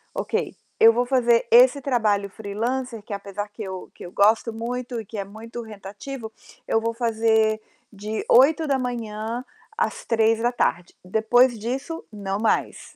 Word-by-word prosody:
"Ok, - - -2 0.2
eu 225 0 +8
vou 245 +1 +1
fazer 240 -3 +3
esse 255 +4 +6
trabalho 215 -6 +1
freelancer 230 +4 -3
que, 205 - -7
apesar 200 +1 -5
que 215 +1 -8
eu 190 -1 -7
que - - -10
eu 175 - -9
gosto 220 +3 +3
muito 240 +1 -4
e - - -13
que 215 - -9
é 200 - -3
muito 225 +4 -9
rentativo, 220 +3 -8 0.4
eu 225 - +2
vou 230 0 -1
fazer 220 -2 +1 0.3
de 210 +1 -5
8:00 305 +6 +6
da 270 -2 +1
manhã 230 -1 -4 0.3
às 470 - -2
15:00 225 -1 +2
da 240 +1 +2
tarde. 175 -6 -1
Depois 230 +5 +3
disso, 265 +9 -4
não 200 -1 -4
mais. 225 - -1
225 Hz, 160 wpm, -24 LUFS, 210-245 Hz, 0.4 s, eu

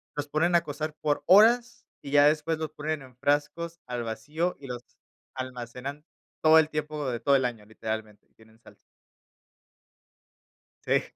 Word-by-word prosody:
los 145 0 -3
ponen 165 +4 +1
a 170 - +5
cocer 155 0 -5
por 145 -1 0
horas, 235 +6 +5 0.2
y 140 - -8
ya 145 0 +6
después 155 +1 +1
los 155 -1 -4
ponen 155 -1 -3
en 130 -2 -16
frascos 150 +5 -1
al 120 -1 -3
vacío 150 +10 -3
y 135 - -10
los 125 -1 -6 0.5
almacenan. 130 +3 -6 0.4
Todo 160 0 +7
el 155 - +2
tiempo 150 -2 -3
de 120 - -3
todo 140 +4 +3
el 130 -2 +2
año, 115 -4 -4
literalmente, 110 -1 -6
tienen 110 0 -21
salsa. - - -18 2.1
Sí, - - +3
145 Hz, 155 wpm, -27 LUFS, 125-155 Hz, 2.1 s, Todo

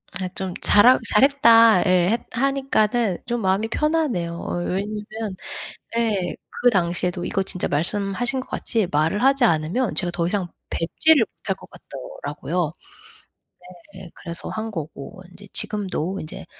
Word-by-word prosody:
아이 185 -1 -3
좀 190 -2 -4
잘하 245 +5 +6
"잘했다." 230 -5 +6
예 180 0 +3
해 230 - +3
하니까는 240 -6 +1
좀 240 -1 -2
마음이 195 +3 +1
편하네요. 290 - 0
어 - - -4
왜냐면 210 +2 -4 0.6
예 205 -6 0 0.3
그 245 - +7
당시에도 175 -2 0
이거 195 - 0
진짜 185 -1 -1
말씀하신 200 - -1
것 260 - -5
같이 225 -5 -1
말을 160 - +1
하지 275 -1 +4
않으면 180 +5 +1
제가 175 -2 -1
더 170 0 -1
이상 195 -2 -1 0.2
뵙지를 265 - +3
못할 195 -1 -3
것 - - -15
같더라고요. 150 +4 -5 1.2
네. 190 -1 -10
그래서 170 -1 -8
한 220 +1 -4
거고 160 -1 -7
인제 200 +2 -15
지금도 195 -3 -1
인제 155 - -8
195 Hz, 290 characters per minute, -23 LUFS, 175-230 Hz, 1.2 s, 그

